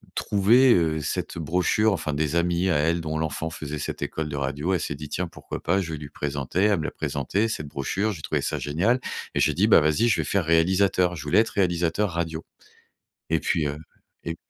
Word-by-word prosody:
trouvé, 115 +6 +4
heu, 80 -3 +1
cette 75 - -3
brochure, 90 +6 +1
enfin 80 -4 -3
des 75 +2 -1
amis 85 +2 +1
à 85 - +2
elle 80 +3 +1
dont 80 -1 -3
l'enfant 80 +1 -2
faisait 75 -2 -6
cette - - -5
école 80 -1 -3
de 70 - -4
radio. 70 +6 -1
Elle 90 - +1
s'est 70 - -3
dit: 75 +1 -8
«Tiens, 90 +2 -2
pourquoi - - -8
pas, 95 +4 +2
je 80 -3 -5
vais - - -3
lui 70 -2 -8
présenter», 70 +5 -3
elle 105 -4 +3
me 80 - -3
l'a - - -3
présenté 80 +8 -1
cette 75 -9 -4
brochure, 95 +10 -2
j'ai 80 - -9
trouvé - - -1
ça - - -2
génial 95 - +1 0.4
et - - +1
j'ai - - +3
dit: - - +2
«Bah, - - +7
vas-y, 80 +10 +2
je - - +2
vais - - -5
faire 100 -3 0
réalisateur», 90 +2 +2
je 75 - -7
voulais 75 +8 +3
être 115 - +2
réalisateur 90 +1 +1
radio 80 -1 -3 0.9
et 80 - +2
puis, 80 -3 0
heu, 75 - -4 0.5
et 85 0 -3
80 Hz, 225 wpm, -25 LUFS, 75-95 Hz, 0.9 s, Bah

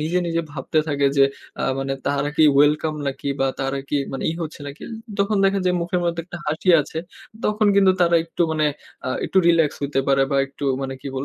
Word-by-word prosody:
নিজে, 165 +4 0
নিজে 165 0 0
ভাবতে 145 +2 -1
থাকে 140 -1 +1
যে 135 - +7 0.4
আ - - 0 0.2
মানে 135 0 -2 0.2
তারা 145 0 0
কি 160 - +6
ওয়েলকাম 150 +2 +3
নাকি 140 +1 -3
বা 135 - +3
তারা 135 +1 -1
কি 145 - 0 0.2
মানে 135 - -4
ই - - -1
হচ্ছে 155 -1 -7
নাকি? 140 +2 -9 0.4
তখন 200 +1 +1
দেখা 195 0 +3
যায় 180 0 +2
মুখের 175 +1 -1
মধ্যে 170 -1 -1
একটা 180 0 -8
হাসি 155 +5 -2
আছে, 160 +3 -5 0.5
তখন 210 0 +2
কিন্তু 195 -2 +5
তারা 170 -1 +4
একটু 165 +1 -2
মানে 155 -1 +1 0.4
আ - - -1 0.2
একটু 190 - +1
রিল্যাক্স 165 -3 +3
হইতে 140 -1 0
পারে 135 0 +4
বা 140 - +1
একটু 140 +1 -8 0.2
মানে 135 0 -4
কি - - -9
বল 135 +1 -2
155 Hz, 220 wpm, -22 LUFS, 140-170 Hz, 0.5 s, যে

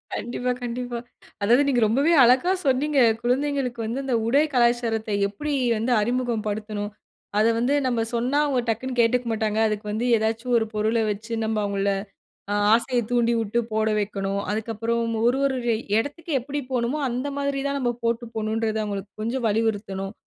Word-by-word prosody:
கண்டிப்பா, 245 +1 -2
கண்டிப்பா. 245 0 -4 0.4
அதாவது, 240 +7 +4
நீங்க 250 -4 +2
ரொம்பவே 275 +9 +3
அழகா 255 +9 +4
சொன்னீங்க. 275 +2 +2 0.2
குழந்தைகளுக்கு 260 -1 0
வந்து, 235 +5 -3
அந்த 260 -3 0
உடை 280 +6 +4
கலாச்சாரத்தை, 235 -3 +1
எப்பிடி 290 +9 -4 0.2
வந்து 230 +4 -1
அறிமுகம் 240 -1 -1
படுத்தணும்? 210 0 -3 0.5
அத 215 - +4
வந்து, 250 +4 +1
நம்ப 240 -2 0
சொன்னா, 250 +5 0
அவுங்க 265 -4 +1
டக்குனு 250 +3 -2
கேட்டுக்க 240 +1 +2
மாட்டாங்க. 220 0 0
அதுக்கு 215 0 -3
வந்து 220 +3 -1
ஏதாச்சு, 220 +2 -1
1 225 -1 0
பொருள 215 +2 +1 0.2
வச்சு, 220 +3 -7
நம்ப 220 -1 0
அவுங்கள 200 0 0 0.6
ஆ - - +1 0.2
ஆசைய 245 +1 +2
தூண்டிவுட்டு 235 -2 +1
போட 220 0 +1
வைக்கணும். 200 -1 -2
அதுக்கப்புறம், 230 +2 -1
ஒரு 245 +3 +3
ஒரு 270 -1 +1 0.4
எடத்துக்கு 310 +6 -5
எப்பிடி 285 +4 -4
போணுமோ, 245 +3 0
அந்த 250 +3 -2
மாதிரி 280 -1 -1
தான் 280 0 -1
நம்ம 245 -2 +1
போட்டு 230 +1 0
போகணுன்றத, 220 0 -1
அவுங்களுக்கு 200 -1 -5
கொஞ்சம் 235 +3 -2
வலியுறுத்தணும், 205 -3 -1
235 Hz, 155 wpm, -24 LUFS, 215-255 Hz, 0.6 s, அதாவது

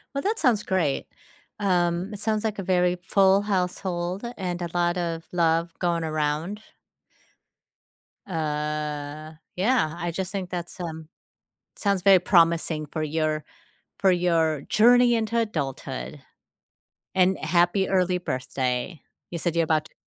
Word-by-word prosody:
Well, 275 - 0
that 430 +3 0
sounds 245 - +3
great. 170 -9 0 0.5
Um, 180 0 +1
it 205 - -6
sounds 215 0 -1
like 215 -2 -2
a - - -3
very 180 -1 +2
full 195 +1 +4
household, 180 -1 -2
and 180 -2 -3
a 175 - -3
lot 175 0 +1
of 165 -2 -2
love 165 -1 +1
going 170 -2 0
around. 155 +6 -2 1.7
Uh, 150 -2 -3 0.2
yeah. 185 -5 +1
I 175 0 -2
just 185 +2 -4
think 190 -3 -4
that's, 175 -1 -6
um 160 -2 -6 0.7
sounds 200 -3 0
very 195 -2 +7
promising 165 -3 +2
for 155 +2 -3
your 155 0 -1 0.6
for 190 - +5
your 165 -4 +2
journey 240 +5 +5
into 230 0 0
adulthood. 135 - -3 0.9
And 190 0 +3
happy 175 +4 +2
early 180 -1 +2
birthday. 130 0 -3 0.3
You 170 - -4
said 170 0 -1
you're 165 - +3
about 155 -1 +1
t - - -19
175 Hz, 135 wpm, -25 LUFS, 155-190 Hz, 1.7 s, very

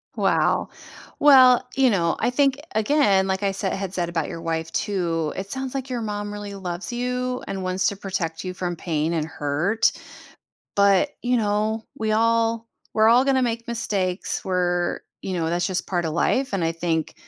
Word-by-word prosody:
Wow. - - +1 0.5
Well, 260 -4 +7
you 265 -1 +4
know, 170 -5 +1
I - - +2
think, 275 +1 +2 0.2
again, 215 -4 +3
like 190 0 -1
I 200 -1 +1
said 195 0 -2
had 195 -1 -4
said 175 -2 -1
about 165 -3 -1
your 165 - -6
wife 165 -1 -3
too, 165 -6 -1
it 195 +1 -5
sounds 265 +3 -4
like 270 -1 -4
your 245 -2 -2
mom 205 -1 -4
really 205 -1 -6
loves 190 +3 -5
you, 250 +1 -2
and 190 -1 -4
wants 185 +1 0
to 200 - -1
protect 185 -5 -4
you 185 0 -4
from 175 -1 -3
pain 160 -1 -1
and 160 -2 0
hurt. 160 +8 0 0.8
But, 200 +8 +4
you 245 0 +2
know, 215 +1 0
we 220 -1 -1
all 230 +1 +1 0.2
we're 220 0 +4
all 245 +3 +6
gonna 270 -1 +3
make 230 -1 -2
mistakes 200 -5 -2
where, 175 -1 0 0.2
you 190 - -4
know, 165 -2 -1
that's 175 +1 0
just 185 -2 -2
part 175 -2 -1
of 160 - -2
life, 260 +10 +1
and 195 -4 0
I 165 - +1
think, 165 -1 -2
195 Hz, 190 wpm, -23 LUFS, 175-230 Hz, 0.8 s, Well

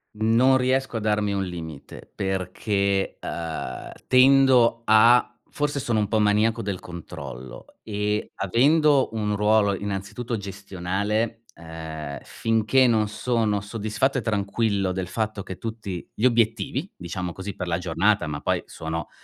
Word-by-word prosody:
Non 115 +5 +4
riesco 130 -1 0
a - - -1
darmi 105 -1 0
un 100 -1 0
limite 80 -5 -8
perché, 95 +1 -1
uhm, 80 -6 -5 0.2
tendo 130 -3 +5
a 120 +3 +5 0.2
forse 145 -1 -2
sono 115 -4 0
un 105 - +1
po' 110 +1 +1
maniaco 105 +2 +2
del 100 -4 -3
controllo 65 -7 -9
e 105 0 -2
avendo 140 - +3
un 105 -2 -1
ruolo 105 -1 +3
innanzitutto 100 +4 -4
gestionale, 100 +3 -3
uhm, 80 -3 -7
finché 115 +3 +2
non 110 -2 +2
sono 110 -2 0
soddisfatto 110 +6 -1
e - - 0
tranquillo 100 -2 0
del 90 -1 -3
fatto 110 0 -3
che 95 - -7
tutti 110 -6 -6
gli 115 - -1
obiettivi, 115 - +1
diciamo 90 0 -5
così, 95 +2 -6
per 90 - -5
la 85 -1 0
giornata 90 +2 +1
ma 75 -1 -4
poi - - 0
sono, 80 0 -5
105 Hz, 135 wpm, -24 LUFS, 95-115 Hz, 0.2 s, tendo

